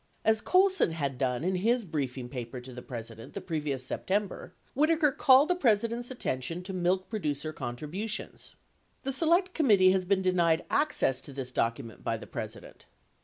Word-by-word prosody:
As 220 Hz, 0 st, +3 dB
Colson 375 Hz, -, +3 dB
had 140 Hz, -5 st, -3 dB
done 125 Hz, +1 st, 0 dB
in 185 Hz, +2 st, +1 dB
his 230 Hz, +4 st, +1 dB
briefing 135 Hz, -6 st, -3 dB
paper 125 Hz, -1 st, -6 dB
to 125 Hz, +1 st, -10 dB
the 125 Hz, -, -8 dB
President 115 Hz, -1 st, -8 dB
the -, -, -2 dB
previous 150 Hz, -7 st, -3 dB
September, 200 Hz, +6 st, -2 dB, 0.2 s
Whitaker 310 Hz, +1 st, +3 dB
called 265 Hz, +2 st, +5 dB
the 360 Hz, -, +3 dB
President's 235 Hz, -, +1 dB
attention 170 Hz, -, -3 dB
to 190 Hz, +1 st, -6 dB
milk 185 Hz, +1 st, 0 dB
producer 155 Hz, -7 st, -3 dB
contri 120 Hz, +1 st, -5 dB
butions. 205 Hz, +7 st, -5 dB, 0.5 s
The 270 Hz, 0 st, -1 dB
Select 345 Hz, +6 st, +3 dB
Committee 205 Hz, -, +5 dB
has 185 Hz, -1 st, +1 dB
been 190 Hz, 0 st, +1 dB
denied 170 Hz, -3 st, +2 dB
access 295 Hz, -, +1 dB
to -, -, -7 dB
this 130 Hz, -2 st, -5 dB
document 115 Hz, -1 st, -2 dB
by -, -, -1 dB
the -, -, -10 dB
President. -, -, -8 dB
180 Hz, 170 wpm, -29 LUFS, -, 0.5 s, called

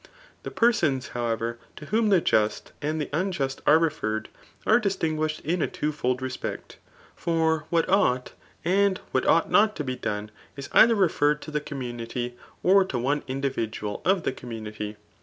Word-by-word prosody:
g -, -, -20 dB, 0.3 s
The -, -, -6 dB
persons, 165 Hz, -, +2 dB
however, 115 Hz, -1 st, -2 dB, 0.2 s
to 150 Hz, -, -10 dB
whom 220 Hz, +5 st, +1 dB
the 190 Hz, -4 st, +5 dB
Just 105 Hz, -6 st, +1 dB
and 155 Hz, +2 st, -1 dB
(he -, -, -5 dB
no* 185 Hz, +6 st, 0 dB
ust 135 Hz, 0 st, -7 dB
are 155 Hz, -, +8 dB
referred, 110 Hz, -10 st, -1 dB, 0.4 s
are 220 Hz, +2 st, +5 dB
di$tinguished 155 Hz, -7 st, -1 dB
in 170 Hz, +2 st, -1 dB
a -, -, +2 dB
twofold 130 Hz, -4 st, -2 dB
respect, 130 Hz, -1 st, -5 dB, 0.4 s
bf 160 Hz, -2 st, +1 dB
what 165 Hz, -1 st, +2 dB
ought 130 Hz, -11 st, +2 dB, 0.3 s
and 195 Hz, +2 st, +3 dB
what 130 Hz, -, +1 dB
ought 165 Hz, -, +3 dB
not 215 Hz, 0 st, +4 dB
to 150 Hz, -, -3 dB
be 130 Hz, -2 st, -3 dB
done 105 Hz, -2 st, -4 dB, 0.3 s
is 140 Hz, -, -7 dB
either 230 Hz, 0 st, +7 dB
referred 150 Hz, -6 st, +2 dB
to 155 Hz, -, -8 dB
the 150 Hz, 0 st, -1 dB
community, 120 Hz, -3 st, -5 dB, 0.3 s
or 195 Hz, +1 st, +6 dB
to 185 Hz, -9 st, -4 dB
one 140 Hz, +5 st, 0 dB
individual 130 Hz, -6 st, -3 dB
of 190 Hz, -2 st, +2 dB
die -, -, 0 dB
community. 110 Hz, -4 st, -7 dB
150 Hz, 170 wpm, -26 LUFS, 120-175 Hz, 0.4 s, are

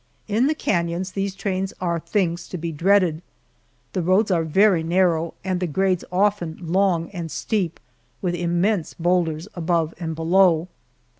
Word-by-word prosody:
In 225 Hz, +5 st, +2 dB
the 310 Hz, -, +1 dB
canons 175 Hz, -, -1 dB
these 195 Hz, 0 st, -3 dB
trains 195 Hz, -1 st, -2 dB
are 170 Hz, -2 st, -1 dB
things 175 Hz, -1 st, -1 dB
to 180 Hz, -, -6 dB
be 165 Hz, 0 st, -4 dB
dreaded. 170 Hz, 0 st, +2 dB, 0.7 s
The 185 Hz, -, 0 dB
roads 190 Hz, +5 st, +2 dB
are 170 Hz, -3 st, +2 dB
very 185 Hz, +2 st, +4 dB
narrow 170 Hz, -1 st, +1 dB
and 185 Hz, -1 st, -1 dB
the 180 Hz, -, -1 dB
grades 185 Hz, +2 st, +1 dB
often 185 Hz, -4 st, +1 dB
long 175 Hz, -1 st, +1 dB
and 170 Hz, -4 st, -5 dB
steep, 180 Hz, +2 st, -2 dB, 0.4 s
with 180 Hz, -2 st, -1 dB
immense 175 Hz, +2 st, 0 dB
boulders 170 Hz, -1 st, 0 dB
above 165 Hz, -2 st, 0 dB
and 160 Hz, -2 st, -3 dB
below. 170 Hz, +1 st, +3 dB
180 Hz, 150 wpm, -23 LUFS, 165-195 Hz, 0.7 s, very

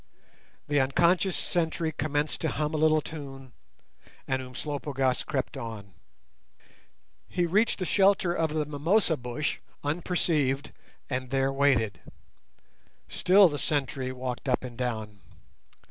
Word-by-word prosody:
The 145 Hz, 0 st, +2 dB
unconscious 170 Hz, +8 st, +3 dB
sentry 165 Hz, -2 st, 0 dB
commenced 150 Hz, -1 st, -1 dB
to 160 Hz, -, 0 dB
hum 150 Hz, +1 st, -2 dB
a -, -, 0 dB
little 155 Hz, 0 st, +4 dB
tune, 135 Hz, -4 st, -9 dB, 0.8 s
and 130 Hz, 0 st, 0 dB
Umslopogaas 135 Hz, 0 st, -2 dB
crept 135 Hz, -4 st, -3 dB
on. 105 Hz, -4 st, -7 dB, 1.3 s
He 175 Hz, -, 0 dB
reached 210 Hz, +7 st, +2 dB
the 185 Hz, -, -2 dB
shelter 195 Hz, -1 st, +3 dB
of 160 Hz, -3 st, 0 dB
the 155 Hz, -1 st, 0 dB
mimosa 160 Hz, +5 st, +2 dB
bush 125 Hz, +3 st, -3 dB, 0.2 s
unperceived 150 Hz, -3 st, 0 dB, 0.4 s
and 130 Hz, -1 st, -3 dB
there 135 Hz, +1 st, +1 dB
waited. 125 Hz, -9 st, +2 dB, 1.1 s
Still 195 Hz, +1 st, +5 dB
the 145 Hz, -3 st, -3 dB
sentry 135 Hz, -3 st, 0 dB
walked 130 Hz, +1 st, -4 dB
up 125 Hz, -, +1 dB
and 125 Hz, -2 st, -7 dB
down. 110 Hz, -4 st, -4 dB
145 Hz, 120 wpm, -28 LUFS, 130-160 Hz, 1.3 s, Still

